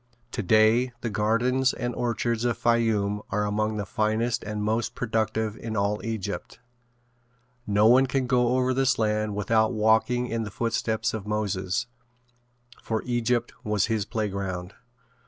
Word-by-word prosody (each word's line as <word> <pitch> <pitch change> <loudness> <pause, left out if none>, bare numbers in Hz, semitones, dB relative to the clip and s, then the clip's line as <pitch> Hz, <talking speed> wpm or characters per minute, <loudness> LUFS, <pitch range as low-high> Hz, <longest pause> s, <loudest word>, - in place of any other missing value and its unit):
Today 110 +3 +3
the 115 - -3
gardens 120 +6 +2
and 120 0 -3
orchards 115 -1 -1
of 120 -2 0
Fayoum 110 -3 +1
are 105 0 0
among 105 +1 -1
the 105 - -2
finest 110 +2 0
and 105 0 -4
most 110 +3 -1
productive 110 -2 -1
in 110 -1 -5
all 100 +1 0
Egypt. 110 -2 -5 1.1
No 105 +1 +3
one 130 +4 +6
can 130 0 0
go 125 0 +2
over 130 0 +2
this 135 0 +2
land 105 -1 0
without 110 +2 +2
walking 110 +3 +2
in 115 -2 -2
the 110 - -4
footsteps 110 +1 -1
of 105 -2 -5
Moses, 105 0 -1 1.0
for 110 -1 -2
Egypt 120 -1 0
was 105 -3 +1
his 105 -3 -1
playground. 95 -4 -3
110 Hz, 140 wpm, -26 LUFS, 105-120 Hz, 1.1 s, one